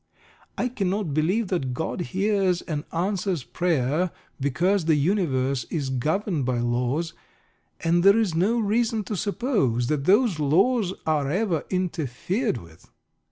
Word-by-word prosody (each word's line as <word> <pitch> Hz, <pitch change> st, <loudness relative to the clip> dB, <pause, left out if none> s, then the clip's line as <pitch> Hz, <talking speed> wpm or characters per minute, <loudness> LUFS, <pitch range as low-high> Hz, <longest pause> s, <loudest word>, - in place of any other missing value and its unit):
I -, -, +1 dB
cannot 200 Hz, -, -2 dB
believe 180 Hz, +8 st, +1 dB
that 135 Hz, -9 st, -1 dB
God 160 Hz, +5 st, -3 dB
hears 190 Hz, -1 st, 0 dB
and 150 Hz, -2 st, -4 dB
answers 185 Hz, -2 st, -1 dB
prayer, 165 Hz, +1 st, 0 dB, 0.3 s
because 165 Hz, +7 st, +1 dB
the 160 Hz, -1 st, +4 dB
universe 140 Hz, -, +1 dB
is 140 Hz, -5 st, -3 dB
governed 155 Hz, -, 0 dB
by 125 Hz, -1 st, 0 dB
laws, 125 Hz, +7 st, -1 dB, 0.7 s
and 170 Hz, +1 st, +2 dB
there 200 Hz, +2 st, +7 dB
is 215 Hz, -7 st, +1 dB
no 195 Hz, +9 st, +2 dB
reason 225 Hz, +1 st, +1 dB
to 210 Hz, -, -4 dB
suppose 200 Hz, -, 0 dB
that 145 Hz, -2 st, 0 dB
those 205 Hz, -2 st, +3 dB
laws 190 Hz, -, +2 dB
are 150 Hz, -3 st, +1 dB
ever 180 Hz, -2 st, 0 dB
interfered 180 Hz, -, -1 dB
with. 85 Hz, -5 st, -15 dB
175 Hz, 135 wpm, -25 LUFS, 140-200 Hz, 0.7 s, there